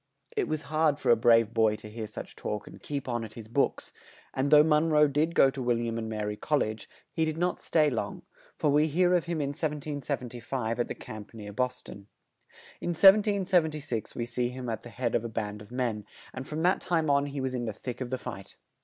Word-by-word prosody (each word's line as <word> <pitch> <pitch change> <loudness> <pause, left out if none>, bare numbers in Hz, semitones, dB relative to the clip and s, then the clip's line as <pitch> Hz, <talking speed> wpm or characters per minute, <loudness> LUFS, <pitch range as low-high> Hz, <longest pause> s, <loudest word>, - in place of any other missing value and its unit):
It - - +1
was 155 0 -2
hard 155 -2 +2
for - - +2
a - - +8
brave 115 -1 +4
boy 110 -2 +3
to 105 - -10
hear 110 0 -6
such 105 - -8
talk 105 - -4
and - - -12
yet - - -22
keep 140 -2 -4
on 120 -2 -1
at 110 -1 -8
his 110 -2 -9
books, 130 +5 0 0.4
and 135 +2 0
though 150 0 +8
Mon 155 +1 +3
roe 150 -1 +5
did 150 +4 0
go 135 - +6
to 135 - -6
Wil 120 -1 +2
liam 115 -1 -2
and 110 -1 -4
Mary 105 -1 -2
Col 150 +7 0
lege, 110 -5 -3 0.2
he 160 - 0
did 155 0 -1
not 180 +1 0
stay 155 -2 +2
long, 125 -6 -3 0.3
for 150 - +1
we 150 +2 +4
hear 175 +4 +3
of 175 -2 +2
him 170 -2 -2
in 140 -2 -1
1775 135 -6 -3
at 120 - +1
the - - -5
camp 110 +1 -10
near 105 -2 -8
Bos 125 +2 -1
ton. 100 0 -11 0.7
In 175 - -1
1776 185 - +3
we 120 - -2
see 120 0 -1
him 125 -1 -6
at 110 -2 -3
the 120 - -10
head 120 -1 -2
of 115 - +1
a 115 - -4
band 105 -2 -4
of 105 - -13
men, 120 -5 -2 0.3
and 130 +1 -6
from 155 +1 -3
that 180 +2 +3
time 165 -3 0
on 140 0 +3
he 140 0 -5
was 130 -1 -2
in 120 -1 -2
the 110 - -2
thick 125 +4 -7
of 125 - -3
the 130 - -1
fight. 120 -6 -8
130 Hz, 240 wpm, -29 LUFS, 115-155 Hz, 0.7 s, a